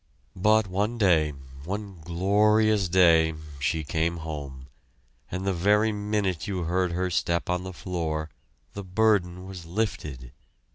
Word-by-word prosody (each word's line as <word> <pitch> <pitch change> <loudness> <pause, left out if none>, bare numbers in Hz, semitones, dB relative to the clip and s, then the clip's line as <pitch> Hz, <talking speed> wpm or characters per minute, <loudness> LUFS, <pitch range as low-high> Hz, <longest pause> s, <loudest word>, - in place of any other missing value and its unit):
But 105 +3 +3
one 100 +5 -1
day, 85 -8 +3 0.3
one 100 0 -6
glorious 105 +3 +2
day 85 -3 +5 0.2
she 75 +3 0
came 80 +3 -1
home, 70 -5 -7 0.6
and 95 +1 -4
the 95 - +1
very 105 +5 +3
minute 105 -5 -1
you 95 -3 -2
heard 90 +1 0
her 90 +1 -1
step 85 +1 0
on 90 0 -1
the 95 - -6
floor, 80 -4 -3 0.4
the 100 - -6
burden 95 -2 +1
was 90 -3 -9
lifted. 75 - -3
90 Hz, 135 wpm, -26 LUFS, 80-100 Hz, 0.6 s, day